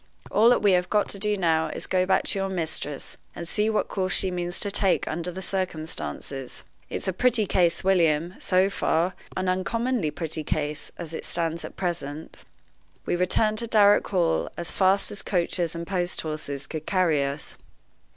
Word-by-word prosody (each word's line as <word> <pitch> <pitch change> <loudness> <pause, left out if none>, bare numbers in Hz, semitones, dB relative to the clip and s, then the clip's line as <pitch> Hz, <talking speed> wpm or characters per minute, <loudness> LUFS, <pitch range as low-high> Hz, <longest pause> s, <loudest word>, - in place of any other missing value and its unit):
All 225 +3 +6
that 245 - +3
we 205 - +5
have 180 -1 +2
got 210 -1 +2
to 200 - -3
do 210 +1 +1
now 160 -3 +2
is - - -5
to - - -7
go 185 -1 +2
back 190 - +3
to 195 - -1
your 195 0 -1
mistress, 160 -5 -4 0.2
and 170 - -6
see 210 +4 +1
what 215 - +1
course 185 -1 -1
she 190 - 0
means 175 0 0
to 200 - +1
take 195 -2 +2
under 170 +3 -3
the 190 +2 -7
circumstances. 160 -7 -4 0.3
It's - - -4
a 190 - +1
pretty 235 +2 +2
case, 175 -2 +2
William, 170 -3 +3
so 185 +1 +3
far 175 0 +1 0.2
an 185 0 -1
uncommonly 215 +1 0
pretty 155 0 -4
case, 150 0 -3
as 165 -2 -7
it - - -5
stands 165 -1 0
at - - -9
present." 160 -4 -4 0.6
We - - 0
returned 215 +4 +2
to 235 - -3
Darrock 205 -2 +5
Hall 175 -4 +1
as 170 - -5
fast 190 +1 +2
as 205 - -7
coaches 175 -2 -1
and 170 0 -4
post 180 -1 -2
horses 145 -3 -5
could 155 -1 -6
carry 170 -7 +2
us. 140 +2 -5
180 Hz, 190 wpm, -26 LUFS, 160-195 Hz, 0.6 s, All